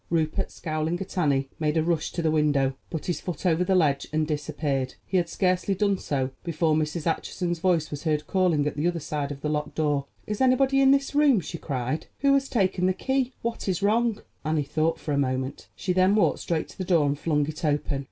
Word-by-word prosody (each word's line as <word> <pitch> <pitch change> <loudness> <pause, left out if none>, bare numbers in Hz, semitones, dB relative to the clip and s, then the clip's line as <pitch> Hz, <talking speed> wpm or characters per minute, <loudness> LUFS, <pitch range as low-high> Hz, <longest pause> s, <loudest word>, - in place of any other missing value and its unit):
Rupert, 160 -2 0
scowling 155 +2 -2
at 195 0 -7
Annie, 140 -6 +1
made 155 0 +1
a 160 - +3
rush 165 -2 0
to 170 - -2
the 160 - +2
window, 145 -3 +2 0.2
put 160 - -5
his 175 - -2
foot 180 +1 -5
over 175 0 +3
the 190 +1 +2
ledge 150 -6 +2
and 155 0 +1
disappeared. 145 -3 -2
He 190 - 0
had 170 -2 +1
scarcely 185 +2 +1
done 200 0 +1
so 135 -2 -1
before 165 -2 +1
Mrs. 155 +1 -1
Acheson's 175 +1 -1
voice 175 -3 +1
was 145 -1 -5
heard 155 -2 0
calling 180 -6 +2
at 150 - -2
the 150 +4 0
other 175 -1 -1
side 145 -1 -3
of 140 -1 -7
the 150 - -1
locked 150 0 -2
door. 145 -3 0 0.2
"Is 210 +2 -3
anybody 265 +1 +4
in 270 - +6
this 275 +1 +3
room?" 285 -6 +5
she 170 0 -6
cried. 130 +1 -3
"Who 275 0 +4
has 275 -1 +2
taken 185 -5 +1
the 185 - +2
key? 265 +1 0
What 230 -2 -3
is 185 -1 -1
wrong?" 225 +1 +2 0.2
Annie 155 -1 0
thought 155 +3 0
for 150 - -4
a 140 - +1
moment; 130 0 -2
she 185 - -1
then 185 +2 +4
walked 215 - +3
straight 165 -2 -2
to - - -15
the - - -1
door 170 -5 +3
and 145 0 0
flung 150 -3 +1
it 155 +4 -7
open. 145 -2 0
160 Hz, 230 wpm, -26 LUFS, 150-185 Hz, 0.2 s, in